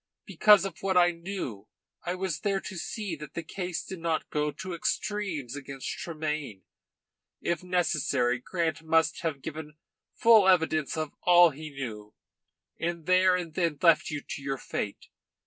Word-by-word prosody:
Because 210 -3 +5
of 190 -4 -6
what 190 -1 +1
I 175 0 +6
knew 170 - -6 0.4
I 175 +1 -2
was 185 -4 -2
there 195 -1 0
to 190 - -8
see 185 +2 -4
that 150 0 -10
the 170 - -3
case 180 +1 -4
did 190 - -7
not 165 -1 -2
go 150 0 0
to 185 +4 -7
extremes 170 - -2
against 140 -1 -7
Tremayne. 150 - -4 0.8
If 170 -2 -1
necessary 145 -9 +1
Grant 165 +3 -2
must 160 0 +2
have 160 -6 -3
given 155 -1 -7 0.4
full 225 -4 +6
evidence 160 -4 +2
of 155 -2 -2
all 175 -1 +7
he 155 +2 -8
knew, 110 -7 -7 0.6
and 170 -1 -3
there 185 +1 +5
and 175 -3 -4
then 165 -3 0
left 165 -2 +4
you 150 -1 -3
to - - -5
your 135 0 -2
fate. 105 -5 -5
165 Hz, 160 wpm, -28 LUFS, 150-180 Hz, 0.8 s, all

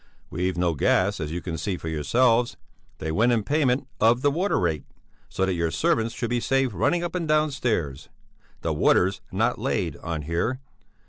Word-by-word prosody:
We've 90 0 -1
no 85 -1 +1
gas, 95 +7 +2
as 80 -1 -4
you 85 +1 -3
can 80 -3 -5
see 95 +1 -2
for 80 - -8
yourselves. 115 - +2 0.4
They 80 - -3
went 115 +9 +3
in 115 -3 +1
payment 140 -1 +1
of 115 +3 +3
the 145 - +4
water 180 +7 0
rate 80 -5 0 0.5
so 95 - 0
that 95 - 0
your 85 -1 0
servants 115 - 0
should 120 -1 -3
be 120 - +1
saved 135 -1 +1
running 170 - +1
up 175 - -3
and 175 -3 -2
down 155 0 +2
stairs; 85 - -2 0.5
the - - -1
water's 95 +2 +2
not - - 0
laid - - -1
on 80 -2 -4
here. 85 - -1
105 Hz, 190 wpm, -25 LUFS, 85-130 Hz, 0.5 s, the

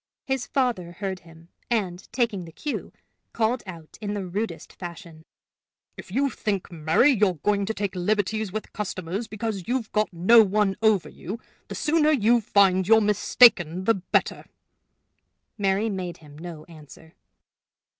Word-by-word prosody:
His 265 -2 -2
father 235 -11 -1
heard 190 0 -4
him, 165 0 -18 0.2
and, 190 -6 -2
taking 230 -6 -1
the 165 - -11
cue, 290 - -5 0.4
called 235 +2 0
out 165 -4 -11
in 205 -1 -3
the 200 -2 -3
rudest 205 +5 -4
fashion: 170 -3 -10 0.7
"If - - -11
you 275 +5 +1
think, 200 -5 -3
Mary, 165 - +3
you're 205 -7 +2
going 200 +5 0
to 220 - -1
take 200 -1 -2
liberties 205 +2 -1
with 215 +2 -6
customers 195 +1 -4
because 215 -4 -4
you've 245 -2 -2
got 210 -2 0
no 190 +7 +6
one 205 -1 +1
over 210 -8 +3
you, 195 +8 -7 0.3
the - - -7
sooner 310 0 +2
you 240 -4 +3
find 190 -3 +3
you're 225 +1 +7
mistaken 200 -4 +4
the 225 - +4
better." 190 -3 -1 1.1
Mary 200 +1 +1
made 185 -4 -4
him 150 -2 -16
no 160 -1 -9
answer. 160 0 -15
200 Hz, 150 wpm, -25 LUFS, 175-220 Hz, 1.1 s, you're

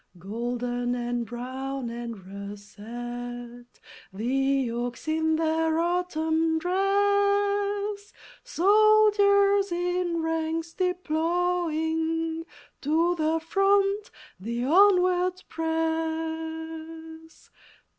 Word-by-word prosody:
Golden 245 +5 -3
and 240 -1 -2
brown 260 +1 -5
and 235 -5 -7
russet 240 +5 -8 0.3
The 265 +4 0
oaks 240 +4 -4
in 320 0 +1
their 320 0 +1
Autumn 325 -2 0
dress; 405 +2 +1 0.3
Soldiers 405 -1 +4
in 350 -1 -1
ranks 325 0 -2
deploying, 330 -2 -1 0.3
To 325 +4 +2
the 320 -1 0
front 395 +4 +2 0.3
they 235 +5 -3
onward 365 +2 +4
press. 320 0 -4
320 Hz, 70 wpm, -26 LUFS, 250-360 Hz, 0.3 s, Soldiers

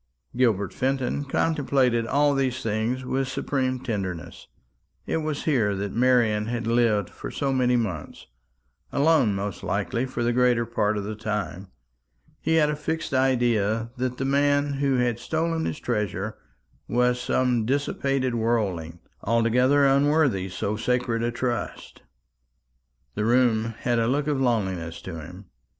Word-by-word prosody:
Gilbert 110 -6 +1
Fenton 135 +1 -1
contemplated 135 -5 +1
all 145 +2 +3
these 130 -2 -1
things 115 +4 -1
with 135 +1 -1
supreme 130 -1 -1
tenderness. 95 -9 -5 0.6
It - - -1
was 155 -2 -3
here 115 -10 +1
that 100 +1 -4
Marian 115 -4 +2
had 120 0 -3
lived 115 -4 +2
for - - -7
so 135 -1 -1
many 125 -1 +2
months 100 -10 -3 0.7
alone 140 -8 +3
most 100 0 -4
likely 125 +3 -1
for 130 -2 -3
the 120 0 +1
greater 125 -1 +3
part 110 -2 0
of 100 - -2
the 105 +2 -4
time. 105 -3 -4 0.7
He 160 - +1
had 155 -2 +4
a 150 - -1
fixed 160 0 -3
idea 120 -4 +1
that 125 0 -2
the 135 - -2
man 145 +1 +2
who 140 -1 +1
had 120 -2 +1
stolen 165 +2 -1
his - - -3
treasure 105 -3 -2 0.5
was 125 +2 +1
some 125 -2 +1
dissipated 135 0 0
worldling, 100 -8 -1 0.2
altogether 125 +5 +3
unworthy 140 -8 +3
so 100 +3 -3
sacred 120 0 0
a 120 - 0
trust. 120 0 -4 1.1
The 105 - -2
room 115 -2 +2
had 120 -1 +1
a 115 - +1
look 140 +3 +1
of 145 -3 0
loneliness 95 -9 -1
to 85 -3 -6
him. 90 +5 -11
120 Hz, 145 wpm, -25 LUFS, 110-135 Hz, 1.1 s, had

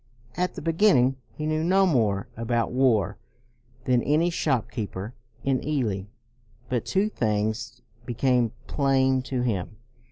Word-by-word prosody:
At 180 0 -1
the - - -7
beginning, 165 -7 +3
he 155 - -5
knew 155 0 0
no 190 +3 +4
more 110 - +1
about 115 +1 -1
war 115 -6 +2 0.6
than 125 -1 +2
any 155 +7 +2
shop 135 -7 0
keeper 105 -2 -5 0.3
in 135 -2 0
Ely; 115 -10 -1 0.6
but 125 -2 -1
two 195 +2 +2
things 115 - -2 0.2
became 120 -1 +1
plain 135 -2 +2
to 125 -1 -2
him. 105 -4 -2
125 Hz, 130 wpm, -26 LUFS, 115-150 Hz, 0.6 s, no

